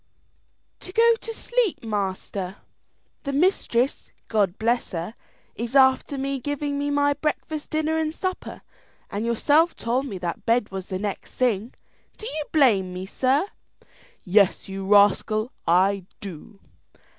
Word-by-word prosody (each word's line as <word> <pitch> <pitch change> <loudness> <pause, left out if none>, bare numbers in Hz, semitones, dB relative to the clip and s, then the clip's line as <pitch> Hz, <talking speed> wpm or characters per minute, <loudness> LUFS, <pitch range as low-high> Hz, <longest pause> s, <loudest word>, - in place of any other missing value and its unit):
"To 370 - -10
go 465 +3 +5
to 455 - -6
sleep, 470 - -1
master. 195 -3 -3 0.7
The 280 - -3
mistress, 275 -5 +1 0.2
God 205 -4 +1
bless 235 0 0
her, 170 +5 -4 0.4
is 235 +3 -5
after 265 +1 +4 0.2
giving 290 +2 -2
me 285 0 -1
my 285 0 +3
breakfast, 305 0 -3
dinner, 315 +1 0
and 310 -1 0
supper, 370 +3 -5 0.5
and 210 +3 -2
yourself 295 +8 +3
told 250 +4 -1
me 200 -7 -5
that 175 -1 -4
bed 230 -2 +1
was 190 -1 -6
the 185 - -2
next 200 0 -5
thing. 235 -2 0 0.4
Do 435 - -9
you 305 -6 -3
blame 220 - +4
me, 185 +1 -5
sir?" 265 - +1 0.8
"Yes, 195 0 +3
you 195 0 -5
rascal, 210 +3 +4 0.2
I 185 +2 +3
do." 195 +1 -9
235 Hz, 135 wpm, -24 LUFS, 195-290 Hz, 0.8 s, go